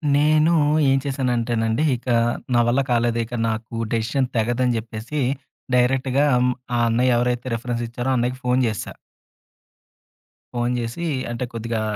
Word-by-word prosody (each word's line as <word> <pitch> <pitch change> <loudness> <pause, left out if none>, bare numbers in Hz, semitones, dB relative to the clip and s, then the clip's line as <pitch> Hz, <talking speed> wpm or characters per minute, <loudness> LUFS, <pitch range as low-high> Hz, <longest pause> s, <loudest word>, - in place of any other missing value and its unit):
నేను 155 +2 +4 0.4
ఏం 135 - +4
చేశానంటేనండి 120 -3 0
ఇక, 125 - -11 0.5
నా 120 - +4
వల్ల 125 +3 +3
కాలేదు 120 -1 +2
ఇక 120 - -12 0.2
నాకు 110 +1 -4 0.2
డెసిషన్ 120 +4 0
తెగదని 120 +2 +1
జెప్పేసి, 115 +6 -4 0.5
డైరెక్ట్‌గా 130 +2 +2 0.5
ఆ - - +1
అన్నయ్య 120 +2 +3
ఎవరైతే 125 +1 0
రిఫరెన్స్ 120 0 -3
ఇచ్చారో 120 +2 -2
అన్నయ్యకి 125 +1 -1
ఫోను 125 +1 +2
జేశా. 110 -3 -4 1.6
ఫోను 120 0 0
జేసి, 120 +9 -4 0.3
అంటే 120 +1 -3
కొద్దిగా 115 -1 -3
120 Hz, 125 wpm, -22 LUFS, 115-130 Hz, 1.6 s, నేను